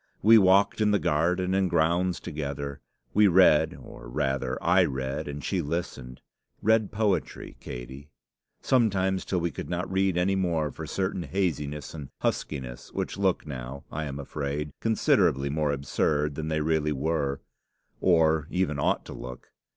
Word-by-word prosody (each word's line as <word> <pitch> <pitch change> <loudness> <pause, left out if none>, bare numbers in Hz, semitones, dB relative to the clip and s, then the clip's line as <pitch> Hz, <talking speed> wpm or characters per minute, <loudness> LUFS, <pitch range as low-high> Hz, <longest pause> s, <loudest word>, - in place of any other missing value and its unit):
We 110 +2 +8
walked 100 +2 +4
in 105 - +4
the 105 - +4
garden 90 +3 +1
and 95 -1 +2
grounds 85 +3 +1
together; 70 -2 -5 0.3
we 105 0 +6
read, 90 -4 +5
or - - -11
rather 65 0 -1
I - - +4
read 65 +3 -3
and 70 -1 -6
she 95 -3 0
listened; 70 -6 -5 0.4
read 110 -1 +2
poetry, 105 -2 -1
Katey 65 +4 -8 0.5
sometimes 95 -7 +2
till 90 - -1
we 85 0 -1
could - - -7
not 90 +2 -3
read 95 -1 +1
any 95 +2 +2
more 85 -5 0
for - - -8
certain 95 -1 -2
haziness 75 -6 -2
and 75 -4 -8
huskiness 60 -2 -3
which - - -3
look 95 -3 +1
now, 70 -1 -7
I 80 +1 -3
am 70 -1 -5
afraid, 70 +1 -4
considerably 70 -10 +2
more 75 -1 0
absurd 75 +2 0
than 80 +2 -4
they 80 -1 0
really 75 -1 +1
were, 70 -1 -1 0.6
or 80 -4 +3
even 90 -6 -1
ought - - +1
to - - -8
look. 60 0 -9
80 Hz, 155 wpm, -27 LUFS, 70-95 Hz, 0.6 s, We